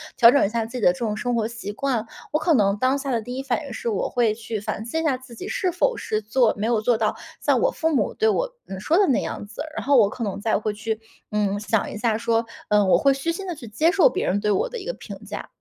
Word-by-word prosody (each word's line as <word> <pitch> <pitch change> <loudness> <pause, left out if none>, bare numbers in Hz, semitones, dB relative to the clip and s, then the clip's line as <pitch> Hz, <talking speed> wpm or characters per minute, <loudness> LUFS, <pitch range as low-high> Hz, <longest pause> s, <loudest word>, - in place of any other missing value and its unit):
调 230 - +8
整 280 - +4
一 195 - 0
下 230 0 -1
自 250 - -6
己 245 - -4
的 180 - +5
这 - - -11
种 215 -2 -1
生 245 +2 -1
活 225 -2 +1
习 230 -3 -6
惯？ 240 -1 -1 0.3
我 305 - +4
可 330 - +2
能 200 -6 +3
当 255 +5 +2
下 275 - -4
的 230 - 0
第 245 +3 -6
1 - - -2
反 275 +3 -1
应 280 - -8
是 235 - -5
我 210 -4 0
会 235 -3 +2
去 220 0 -5
反 210 +1 -4
思 320 +8 -2
一 - - -1
下 300 -5 +2
自 255 -1 -14
己 230 - -7
是 370 - 0
否 415 +8 +1
是 215 0 -2
做 220 +2 +2
没 210 +2 -1
有 230 -3 +2
做 235 +1 +2
到 220 -1 0 0.2
像 - - +2
我 - - +3
父 320 -8 0
母 - - +1
对 440 - +1
我 - - +1
嗯， 190 - -6
说 320 +8 +2
的 400 -1 +5
那 265 - +2
样 - - -5
子， 215 +7 -7 0.2
然 - - -3
后 285 - +4
我 215 -6 +6
可 230 +2 -4
能 200 - -3
再 220 +1 +2
会 210 0 -2
去， 220 +1 -3 0.3
嗯， 205 -1 0
想 220 0 0
一 - - -6
下 220 0 +1
说 230 0 +1 0.2
嗯， 210 -1 +4
我 - - +6
会 275 -1 +4
虚 275 +5 -1
心 385 +3 -5
地 350 - -3
去 280 - -10
接 305 +10 +2
受 400 +6 +6
别 - - -2
人 200 +2 +1
对 210 0 +1
我 470 - +1
的 - - -6
一 405 - -7
个 - - -1
评 - - -9
价。 - - -6
235 Hz, 320 characters per minute, -23 LUFS, 215-285 Hz, 0.3 s, 调